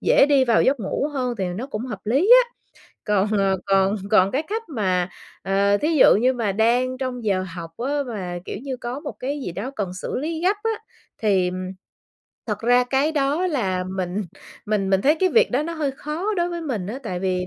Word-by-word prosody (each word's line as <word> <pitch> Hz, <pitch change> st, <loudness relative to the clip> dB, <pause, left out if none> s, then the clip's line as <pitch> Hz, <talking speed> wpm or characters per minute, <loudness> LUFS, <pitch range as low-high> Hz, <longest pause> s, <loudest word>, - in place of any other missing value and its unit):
dễ -, -, +5 dB
đi 280 Hz, -2 st, +4 dB
vào 235 Hz, -3 st, +3 dB
giấc 270 Hz, -1 st, +2 dB
ngủ 215 Hz, +8 st, -1 dB
hơn 250 Hz, -3 st, -1 dB
thì 190 Hz, -, 0 dB
nó 205 Hz, +9 st, -4 dB
cũng 235 Hz, -2 st, -5 dB
hợp 215 Hz, -6 st, -6 dB
lý 275 Hz, -, +2 dB
á. 480 Hz, -, -22 dB, 0.5 s
Còn 205 Hz, -1 st, +2 dB
ờ, 195 Hz, -1 st, +2 dB
còn 195 Hz, +1 st, +3 dB
còn 195 Hz, -3 st, +5 dB
cái 275 Hz, +7 st, 0 dB
cách 430 Hz, +8 st, -4 dB
mà, 185 Hz, -, 0 dB, 0.3 s
ờ, 200 Hz, +1 st, +2 dB
thí 300 Hz, -, 0 dB
dụ 275 Hz, -, +7 dB
như 255 Hz, +2 st, +3 dB
mà 230 Hz, -6 st, -1 dB
đang 245 Hz, +5 st, +1 dB
trong 255 Hz, -3 st, -4 dB
giờ 190 Hz, -3 st, +1 dB
học 170 Hz, -2 st, -7 dB
á, 260 Hz, +4 st, -2 dB
mà, 185 Hz, -7 st, -4 dB
kiểu -, -, -5 dB
như, 265 Hz, -2 st, -4 dB
có 245 Hz, +2 st, -5 dB
một 290 Hz, -, -6 dB
cái 280 Hz, +3 st, -3 dB
gì 180 Hz, -, -4 dB
đó 205 Hz, +9 st, -4 dB
cần 195 Hz, -4 st, -2 dB
xử 185 Hz, -, -4 dB
lý 315 Hz, +4 st, -3 dB
gấp 385 Hz, +4 st, +3 dB
á, 450 Hz, -, 0 dB, 0.5 s
thì, 195 Hz, -4 st, +2 dB
ừm, 185 Hz, 0 st, -4 dB, 0.8 s
thật 210 Hz, -3 st, -2 dB
ra 245 Hz, +2 st, +4 dB
cái 270 Hz, +5 st, +1 dB
đó 295 Hz, +4 st, +1 dB
là 195 Hz, -, -1 dB
mình 185 Hz, +1 st, -3 dB, 0.4 s
mình 205 Hz, -2 st, 0 dB
mình 190 Hz, -1 st, +3 dB
thấy 295 Hz, +3 st, +5 dB
cái 375 Hz, -, +4 dB
việc 460 Hz, +5 st, +4 dB
đó 260 Hz, +4 st, +1 dB
nó 335 Hz, +2 st, -4 dB
hơi 305 Hz, -4 st, -1 dB
khó 310 Hz, +10 st, -3 dB
đối 345 Hz, -1 st, +1 dB
với 345 Hz, -1 st, -4 dB
mình 245 Hz, -, -3 dB
á. 225 Hz, +6 st, -5 dB
Tại 185 Hz, -7 st, -4 dB
vì 185 Hz, -1 st, -1 dB
240 Hz, 225 wpm, -23 LUFS, 195-285 Hz, 0.8 s, dụ